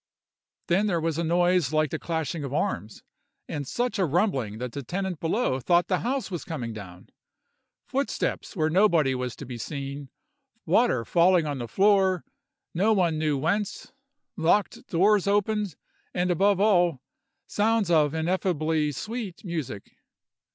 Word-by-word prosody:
Then 195 Hz, +5 st, +2 dB
there 175 Hz, -4 st, +1 dB
was 165 Hz, 0 st, -1 dB
a -, -, 0 dB
noise 175 Hz, -2 st, +2 dB
like 155 Hz, -2 st, +1 dB
the -, -, -3 dB
clashing 160 Hz, -2 st, -3 dB
of 140 Hz, -, -5 dB
arms, 140 Hz, -, -2 dB, 0.4 s
and 145 Hz, -2 st, -4 dB
such 240 Hz, -, -2 dB
a 190 Hz, -, +3 dB
rumbling 140 Hz, -, 0 dB
that 125 Hz, +1 st, -5 dB
the 140 Hz, -, -5 dB
tenant 180 Hz, +4 st, -3 dB
below 165 Hz, -, 0 dB
thought 175 Hz, +6 st, +2 dB
the 185 Hz, -, +2 dB
house 255 Hz, -2 st, -2 dB
was 175 Hz, -, -4 dB
coming 125 Hz, -8 st, -5 dB
down; 90 Hz, -4 st, -11 dB, 0.8 s
footsteps 270 Hz, -3 st, -2 dB
where 155 Hz, -3 st, +1 dB
nobody 170 Hz, -7 st, +4 dB
was 125 Hz, -1 st, -3 dB
to 145 Hz, -, -9 dB
be 125 Hz, -2 st, -7 dB
seen, 140 Hz, +1 st, -6 dB, 0.6 s
water 225 Hz, -, +2 dB
falling 175 Hz, -1 st, +4 dB
on 145 Hz, -3 st, -3 dB
the 120 Hz, -, -4 dB
floor, 190 Hz, -, +3 dB, 0.5 s
no 205 Hz, +6 st, +3 dB
one 170 Hz, -6 st, +1 dB
knew 155 Hz, -2 st, +1 dB
whence, 190 Hz, +8 st, -2 dB, 0.4 s
locked 175 Hz, +5 st, +1 dB
doors 200 Hz, +3 st, +3 dB
opened, 205 Hz, -2 st, +1 dB, 0.4 s
and 180 Hz, 0 st, +1 dB
above 195 Hz, +2 st, +3 dB
all, 175 Hz, -8 st, +3 dB, 0.5 s
sounds 215 Hz, -3 st, +1 dB
of 155 Hz, -2 st, +3 dB
ineffably 160 Hz, -3 st, 0 dB
sweet 215 Hz, -, -6 dB
music. 155 Hz, -, -5 dB
170 Hz, 150 wpm, -26 LUFS, 145-195 Hz, 0.8 s, nobody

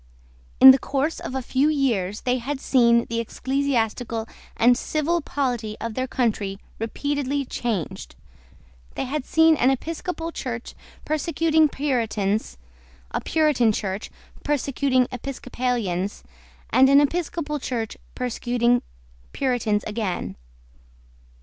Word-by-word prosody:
In 265 Hz, -, +12 dB
the 265 Hz, -, +3 dB
course 285 Hz, +5 st, -1 dB
of 255 Hz, -, -6 dB
a 265 Hz, -, -2 dB
few 270 Hz, +4 st, +2 dB
years 225 Hz, -10 st, 0 dB
they 250 Hz, 0 st, 0 dB
had 270 Hz, +3 st, -4 dB
seen 235 Hz, -3 st, +4 dB
the 230 Hz, 0 st, -3 dB
ecclesiastical 235 Hz, -2 st, -1 dB, 0.3 s
and 245 Hz, +2 st, +5 dB
civil 320 Hz, +6 st, 0 dB
polity 245 Hz, -8 st, -2 dB
of 230 Hz, -1 st, -4 dB
their 255 Hz, +3 st, -2 dB
country 210 Hz, -6 st, -1 dB, 0.2 s
repeatedly 280 Hz, +4 st, -2 dB
changed. 210 Hz, -, -4 dB, 0.8 s
They -, -, -2 dB
had 275 Hz, +1 st, -3 dB
seen 320 Hz, 0 st, +5 dB
an 255 Hz, -, +4 dB
Episcopal 330 Hz, +4 st, -3 dB
Church 240 Hz, -6 st, -5 dB, 0.3 s
persecuting 315 Hz, 0 st, +2 dB
Puritans, 225 Hz, -, -1 dB, 0.5 s
a -, -, -2 dB
Puritan 300 Hz, -8 st, +2 dB
Church 200 Hz, 0 st, -3 dB, 0.3 s
persecuting 275 Hz, -3 st, +1 dB
Episcopalians, 245 Hz, -7 st, -3 dB, 0.5 s
and 265 Hz, +1 st, +6 dB
an 280 Hz, +1 st, +7 dB
Episcopal 300 Hz, 0 st, -1 dB
Church 230 Hz, -4 st, -3 dB, 0.2 s
persecuting 245 Hz, 0 st, +1 dB, 0.5 s
Puritans 240 Hz, -6 st, 0 dB
again. 195 Hz, -, -3 dB
255 Hz, 110 wpm, -24 LUFS, 230-285 Hz, 0.8 s, In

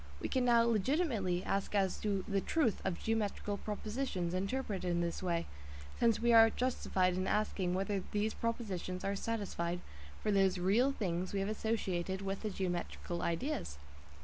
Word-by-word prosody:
We -, -, -3 dB
can 255 Hz, -1 st, +1 dB
now 235 Hz, -1 st, +6 dB
legitimately 225 Hz, -, +1 dB
ask 195 Hz, +1 st, -1 dB
as 195 Hz, -2 st, +2 dB
to 200 Hz, -3 st, -1 dB
the 200 Hz, -1 st, +1 dB
"truth" 290 Hz, -6 st, +1 dB
of 185 Hz, -3 st, -1 dB
geometrical 210 Hz, -2 st, -1 dB
propositions 210 Hz, -4 st, -3 dB
interpreted 195 Hz, -1 st, -2 dB
in 175 Hz, 0 st, +1 dB
this 170 Hz, -1 st, -2 dB
way, 170 Hz, -2 st, 0 dB, 0.5 s
since 230 Hz, -2 st, +4 dB
we 235 Hz, 0 st, +3 dB
are 225 Hz, 0 st, +9 dB
justified 195 Hz, -7 st, +1 dB
in 185 Hz, +1 st, -1 dB
asking 195 Hz, -4 st, 0 dB
whether 195 Hz, +1 st, 0 dB
these 210 Hz, +1 st, 0 dB
propositions 195 Hz, -6 st, -3 dB
are 200 Hz, +1 st, 0 dB
satisfied 195 Hz, -5 st, -2 dB, 0.4 s
for 210 Hz, -, +2 dB
those 195 Hz, -2 st, +3 dB
real 210 Hz, +9 st, +3 dB
things 185 Hz, -7 st, -2 dB
we 200 Hz, -, 0 dB
have 195 Hz, +1 st, -1 dB
associated 195 Hz, -4 st, -1 dB
with 195 Hz, 0 st, -3 dB
the 215 Hz, -, -2 dB
geometrical 175 Hz, -2 st, -3 dB
ideas. 170 Hz, -, -2 dB
200 Hz, 160 wpm, -34 LUFS, 185-225 Hz, 0.5 s, are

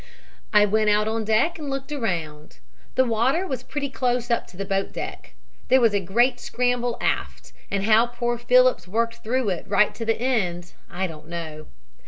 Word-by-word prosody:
"I 210 Hz, -1 st, +6 dB
went 215 Hz, +1 st, +2 dB
out 210 Hz, +1 st, +3 dB
on 225 Hz, 0 st, -1 dB
deck 240 Hz, +11 st, +2 dB
and 295 Hz, -2 st, -5 dB
looked 275 Hz, +1 st, -4 dB
around. 165 Hz, -, -4 dB, 0.4 s
The 260 Hz, -, +4 dB
water 250 Hz, +10 st, +1 dB
was 260 Hz, -9 st, -4 dB
pretty 280 Hz, +1 st, -4 dB
close 245 Hz, -2 st, -1 dB
up 235 Hz, -, 0 dB
to 180 Hz, -, -16 dB
the 195 Hz, -, -3 dB
boat 195 Hz, 0 st, -1 dB
deck. -, -, -7 dB, 0.3 s
There 260 Hz, -, +5 dB
was 230 Hz, -4 st, +4 dB
a 205 Hz, -, +2 dB
great 240 Hz, +7 st, +2 dB
scramble 245 Hz, -1 st, -1 dB
aft, -, -, -2 dB, 0.2 s
and 200 Hz, -1 st, -1 dB
how 220 Hz, +3 st, +5 dB
poor 240 Hz, 0 st, -2 dB
Phillips 250 Hz, -5 st, +4 dB
worked 230 Hz, +4 st, -1 dB
through 245 Hz, 0 st, 0 dB
it 180 Hz, -3 st, -2 dB
right 205 Hz, +1 st, +3 dB
to 230 Hz, -, -6 dB
the 225 Hz, 0 st, 0 dB
end 180 Hz, -9 st, -1 dB, 0.2 s
I 185 Hz, +2 st, -2 dB
don't 155 Hz, -3 st, -9 dB
know. 160 Hz, -2 st, -7 dB
225 Hz, 190 wpm, -24 LUFS, 195-250 Hz, 0.4 s, I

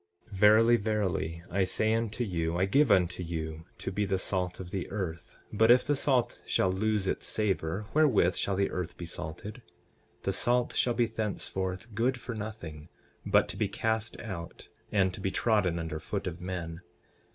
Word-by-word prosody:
12:13 100 Hz, -, -7 dB
Verily, 110 Hz, +3 st, +7 dB
verily, 95 Hz, -6 st, -1 dB
I 95 Hz, +1 st, +2 dB
say 110 Hz, +4 st, +1 dB
unto 115 Hz, +1 st, -1 dB
you, 85 Hz, -5 st, -1 dB
I 95 Hz, -, +3 dB
give 135 Hz, +6 st, +4 dB
unto 90 Hz, -1 st, +3 dB
you 80 Hz, -2 st, -4 dB
to -, -, -4 dB
be 105 Hz, +2 st, 0 dB
the 95 Hz, -1 st, +1 dB
salt 90 Hz, -1 st, -2 dB
of 90 Hz, -2 st, -7 dB
the 95 Hz, -3 st, -3 dB
earth; 90 Hz, -6 st, -5 dB, 0.2 s
but 110 Hz, +2 st, +4 dB
if 125 Hz, +1 st, +7 dB
the 145 Hz, -, +2 dB
salt 130 Hz, -3 st, +1 dB
shall 95 Hz, -, +1 dB
lose 105 Hz, +1 st, 0 dB
its -, -, -1 dB
savor 100 Hz, -2 st, -1 dB
wherewith 130 Hz, -, +4 dB
shall 100 Hz, -, -1 dB
the 100 Hz, +1 st, +1 dB
earth 90 Hz, -2 st, -4 dB
be 85 Hz, -, -6 dB
salted? 85 Hz, +8 st, -6 dB, 0.6 s
The 95 Hz, -, 0 dB
salt 120 Hz, +5 st, +1 dB
shall 120 Hz, -1 st, +2 dB
be 120 Hz, -, +3 dB
thenceforth 105 Hz, -2 st, -3 dB
good 125 Hz, +4 st, +1 dB
for 120 Hz, -, -5 dB
nothing, 95 Hz, -8 st, -7 dB, 0.4 s
but -, -, +4 dB
to -, -, -6 dB
be -, -, +1 dB
cast 110 Hz, 0 st, -1 dB
out 90 Hz, -6 st, -7 dB, 0.2 s
and 95 Hz, -3 st, +2 dB
to 95 Hz, -, -7 dB
be 95 Hz, -, 0 dB
trodden 100 Hz, -5 st, +2 dB
under 80 Hz, -2 st, -3 dB
foot 100 Hz, +4 st, -4 dB
of 90 Hz, -1 st, -5 dB
men. 85 Hz, -2 st, -5 dB
95 Hz, 185 wpm, -30 LUFS, 90-110 Hz, 0.6 s, Verily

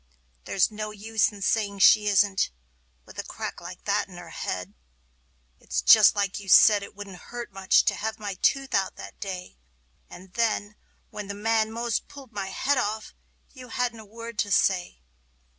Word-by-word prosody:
There's 195 Hz, +2 st, +2 dB
no 215 Hz, 0 st, -5 dB
use 215 Hz, +1 st, 0 dB
in 200 Hz, -2 st, -9 dB
saying 200 Hz, -1 st, 0 dB
she 210 Hz, +2 st, +6 dB
isn't, 200 Hz, -1 st, +3 dB, 0.6 s
with -, -, -12 dB
a -, -, -2 dB
crack -, -, -7 dB
like 175 Hz, +1 st, -10 dB
that 205 Hz, 0 st, +1 dB
in 180 Hz, -2 st, -13 dB
her 170 Hz, -2 st, -10 dB
head. 95 Hz, -5 st, -5 dB, 0.9 s
It's -, -, -3 dB
just 60 Hz, -, +7 dB
like 200 Hz, -1 st, -1 dB
you 200 Hz, -1 st, -10 dB
said 205 Hz, +2 st, +7 dB
it 200 Hz, -, -10 dB
wouldn't 200 Hz, -3 st, -9 dB
hurt 240 Hz, -1 st, -6 dB
much 190 Hz, -1 st, +3 dB
to -, -, +2 dB
have 220 Hz, +1 st, -4 dB
my 205 Hz, -2 st, -5 dB
tooth 270 Hz, -1 st, +1 dB
out, 190 Hz, -1 st, 0 dB
that -, -, -11 dB
day; 185 Hz, -, -7 dB, 0.5 s
And 185 Hz, +1 st, -13 dB
then, 215 Hz, -2 st, -1 dB, 0.4 s
when 210 Hz, -1 st, -7 dB
the 200 Hz, -, -5 dB
man 220 Hz, +1 st, +1 dB
'most 235 Hz, 0 st, -2 dB
pulled 275 Hz, -4 st, -13 dB
my 200 Hz, -3 st, -4 dB
head 265 Hz, +8 st, 0 dB
off, 215 Hz, 0 st, -3 dB, 0.4 s
you 255 Hz, -3 st, -11 dB
hadn't 240 Hz, -1 st, -2 dB
a 220 Hz, -, -11 dB
word 230 Hz, +1 st, -9 dB
to 205 Hz, -, 0 dB
say. 180 Hz, -, +1 dB
205 Hz, 180 wpm, -26 LUFS, 190-225 Hz, 0.9 s, just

